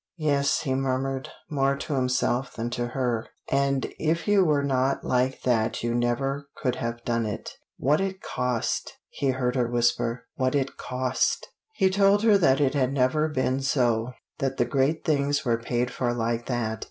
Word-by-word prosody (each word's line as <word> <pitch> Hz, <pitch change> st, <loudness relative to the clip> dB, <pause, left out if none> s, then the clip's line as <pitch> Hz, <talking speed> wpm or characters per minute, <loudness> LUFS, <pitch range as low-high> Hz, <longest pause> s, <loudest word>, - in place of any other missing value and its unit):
"Yes," 145 Hz, -2 st, +1 dB
he 135 Hz, -4 st, -1 dB
murmured, 135 Hz, 0 st, -1 dB, 0.2 s
more 140 Hz, -2 st, +1 dB
to 140 Hz, +2 st, -4 dB
himself 125 Hz, -1 st, 0 dB
than 115 Hz, +1 st, -3 dB
to 120 Hz, 0 st, -2 dB
her, 120 Hz, -2 st, -1 dB, 0.2 s
"and 140 Hz, 0 st, +2 dB
if 165 Hz, +4 st, 0 dB
you 205 Hz, -2 st, +5 dB
were 150 Hz, -4 st, +2 dB
not 135 Hz, -1 st, +1 dB
like 130 Hz, +1 st, 0 dB
that 115 Hz, -3 st, +1 dB
you 120 Hz, 0 st, 0 dB
never 135 Hz, +4 st, -1 dB
could 130 Hz, -5 st, -1 dB
have 115 Hz, 0 st, -4 dB
done 115 Hz, -2 st, 0 dB
it." 105 Hz, -, -5 dB, 0.3 s
"What 150 Hz, +6 st, +2 dB
it 190 Hz, -1 st, -2 dB
cost!" 125 Hz, -7 st, -2 dB
he 140 Hz, -, -2 dB
heard 125 Hz, -1 st, 0 dB
her 125 Hz, -2 st, +2 dB
whisper. 120 Hz, 0 st, 0 dB
"What 130 Hz, +1 st, 0 dB
it 135 Hz, -1 st, 0 dB
cost!" 130 Hz, 0 st, -1 dB, 0.3 s
He 190 Hz, -3 st, +3 dB
told 200 Hz, +1 st, +4 dB
her 210 Hz, -3 st, +5 dB
that 135 Hz, -6 st, +4 dB
it 140 Hz, -2 st, +2 dB
had 135 Hz, -1 st, 0 dB
ever 135 Hz, +5 st, +2 dB
been 130 Hz, -2 st, 0 dB
so. 125 Hz, -3 st, +1 dB, 0.3 s
That 135 Hz, 0 st, -1 dB
the 120 Hz, -, +2 dB
great 135 Hz, +5 st, 0 dB
things 145 Hz, -2 st, +1 dB
were 115 Hz, -2 st, +2 dB
paid 120 Hz, +1 st, -1 dB
for 120 Hz, -2 st, -1 dB
like 115 Hz, 0 st, -1 dB
that. 110 Hz, -4 st, -2 dB
130 Hz, 180 wpm, -26 LUFS, 120-140 Hz, 0.3 s, you